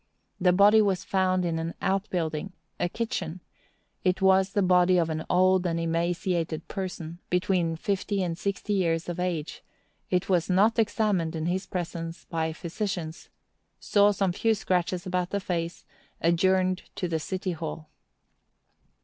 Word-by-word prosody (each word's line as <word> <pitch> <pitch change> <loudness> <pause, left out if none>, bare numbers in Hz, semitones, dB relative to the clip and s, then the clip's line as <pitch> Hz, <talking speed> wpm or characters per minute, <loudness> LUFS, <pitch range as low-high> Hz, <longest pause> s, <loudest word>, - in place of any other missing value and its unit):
The 180 -1 +4
body 205 +4 +6
was 195 -3 +1
found 185 -1 +1
in 165 -1 -1
an 165 +1 -4
outbuilding—a 175 -3 -2
kitchen; 185 -6 -3 0.6
it 185 -1 +2
was 190 0 +4
the 205 - +2
body 180 0 +4
of 165 -2 +1
an 155 0 -3
old 185 0 +4
and 165 -1 -1
emaciated 165 0 -1
person, 175 -4 -5
between 180 -2 +1
fifty 195 +2 -1
and 170 -2 -2
sixty 200 +3 -2
years 165 -4 +1
of 175 0 -4
age; 170 -4 -3 0.5
it 180 -1 +1
was 180 -2 +1
not 210 +5 +3
examined 205 -7 +1
in 160 0 -2
his 185 +3 -1
presence 170 -1 -5
by 160 -1 -2
physicians; 170 0 -5 0.5
saw 205 0 +4
some 195 -2 +1
few 225 +4 +2
scratches 180 -2 -1
about 180 -1 -1
the 200 - -1
face; 170 -3 -3 0.3
adjourned 185 +2 +2
to 180 - -2
the 165 -1 -1
City 185 +3 -3
Hall. 155 -1 -6
180 Hz, 145 wpm, -27 LUFS, 165-190 Hz, 0.6 s, body